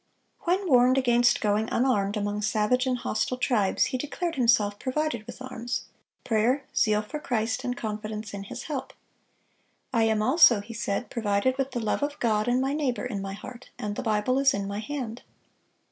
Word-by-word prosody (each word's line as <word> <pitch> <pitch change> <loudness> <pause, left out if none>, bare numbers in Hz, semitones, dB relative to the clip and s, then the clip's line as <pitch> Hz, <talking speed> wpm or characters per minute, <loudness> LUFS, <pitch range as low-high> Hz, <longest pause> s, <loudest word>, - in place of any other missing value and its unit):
When 370 +3 +1
warned 255 -2 +5
against 240 -2 +3
going 210 +1 +1
unarmed 210 -5 +1
among 205 0 -2
savage 215 +5 +1
and 255 -1 +1
hostile 240 +1 -1
tribes, 220 -7 +2
he 255 - 0
declared 330 +5 -3
himself 230 -6 +2
"provided 260 -4 -2
with - - -9
arms,"—"prayer, 245 0 -2
zeal 215 -1 +3
for 300 +8 -6
Christ, 230 -2 -1
and 245 -1 -2
confidence 215 -1 -5
in 200 0 -6
His - - -7
help." 290 -4 -5 1.0
"I 230 -2 +3
am 220 -1 +2
also," 255 -3 +6
he 220 +3 -9
said, 210 0 -3
"provided 220 +2 +1
with 270 0 0
the 250 -3 -3
love 220 +3 -1
of 290 0 -2
God 215 -2 +1
and 245 +1 +2
my 270 +2 0
neighbor 275 -5 -1
in 215 -6 -3
my 195 0 -5
heart, 240 +5 -10
and 205 -1 -4
the - - -3
Bible 220 +3 +1
is 275 -4 +4
in 200 0 -3
my 200 +1 -4
hand." 240 -1 -5
235 Hz, 180 wpm, -27 LUFS, 210-260 Hz, 1.0 s, also